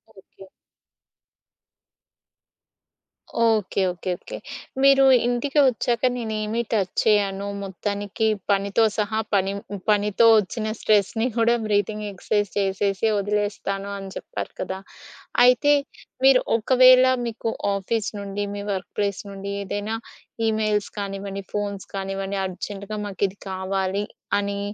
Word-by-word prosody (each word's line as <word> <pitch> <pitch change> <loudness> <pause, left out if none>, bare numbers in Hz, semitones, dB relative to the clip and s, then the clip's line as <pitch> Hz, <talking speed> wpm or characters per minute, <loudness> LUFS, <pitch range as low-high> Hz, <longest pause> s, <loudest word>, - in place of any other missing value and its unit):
Okay. 195 0 -16 3.0
Okay. 215 -3 +1
Okay. 180 +1 -4
Okay. - - -8 0.5
మీరు 275 0 +6 0.2
ఇంటికి 270 +4 0
వచ్చాక 240 -1 0
నేనేమి 220 -1 -2
టచ్ 195 -5 0
చేయను. 200 -2 +2 0.2
మొత్తానికి 205 +2 -2 0.2
పనితో 200 +3 +2
సహా 215 +1 0
పనిని 200 +1 -1
పనితో 210 +2 +3
వచ్చిన 215 +2 -3
స్ట్రెస్‌ని 215 +3 +2
కూడా 230 +1 +4
బ్రీతింగ్ 210 0 0
ఎక్సర్సైజ్ 205 +1 -1
చేసేసి 195 +1 0
వదిలేస్తాను 200 -1 -2
అని 195 -1 -7
చెప్పారు - - -6
కదా! 190 0 -3 0.7
అయితే 250 +4 +5 0.5
మీరు 265 -1 +7 0.2
ఒకవేళ 255 +2 +6 0.2
మీ 230 - -2 0.4
ఆఫీసు 210 +2 -1
నుండి, 200 +1 -3
మీ 200 - -5
వర్క్‌ప్లేస్ 200 +1 -2
నుండి 200 0 -6
ఏదైనా 205 +3 -3 0.5
ఈమెయిల్స్ 215 -1 0
కానివ్వండి, 195 0 -4
ఫోన్స్ 200 -2 -3
కానివ్వండి, 195 0 -3
అర్జెంట్‌గా 200 +3 -6
మాకిది 200 0 -2
కావాలి 190 +1 -1 0.3
అని 200 0 -2
205 Hz, 105 wpm, -23 LUFS, 195-220 Hz, 3.0 s, మీరు